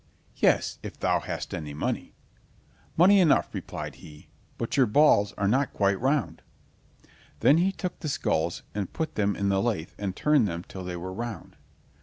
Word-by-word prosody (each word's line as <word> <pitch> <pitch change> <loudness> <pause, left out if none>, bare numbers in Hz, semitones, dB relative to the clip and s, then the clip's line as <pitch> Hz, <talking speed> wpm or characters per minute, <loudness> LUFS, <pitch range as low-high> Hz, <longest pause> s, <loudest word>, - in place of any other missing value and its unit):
"Yes, - - +2
if - - -9
thou - - +2
hast - - -5
any 75 -2 -5
money." - - -3 0.8
"Money 195 +4 +6
enough," 170 -5 +3
replied - - -6
he, 75 -1 -14 0.3
"but 115 - -3
your 130 -3 +4
balls 105 -4 +4
are 100 - -1
not 130 +6 +1
quite 100 0 +1
round." 135 +1 0 1.0
Then 150 +4 +5
he 185 +3 +2
took 180 -2 -5
the 155 - -4
skulls 85 - -1
and 100 -3 -3
put 160 -1 -3
them 100 -1 0
in 100 0 0
the 95 0 +2
lathe 100 -9 -2
and 100 -2 -3
turned 150 -7 +3
them 85 -1 -4
till 95 - -8
they 90 -1 -5
were 95 +2 -6
round. 115 +2 -6
105 Hz, 175 wpm, -27 LUFS, 95-145 Hz, 1.0 s, Money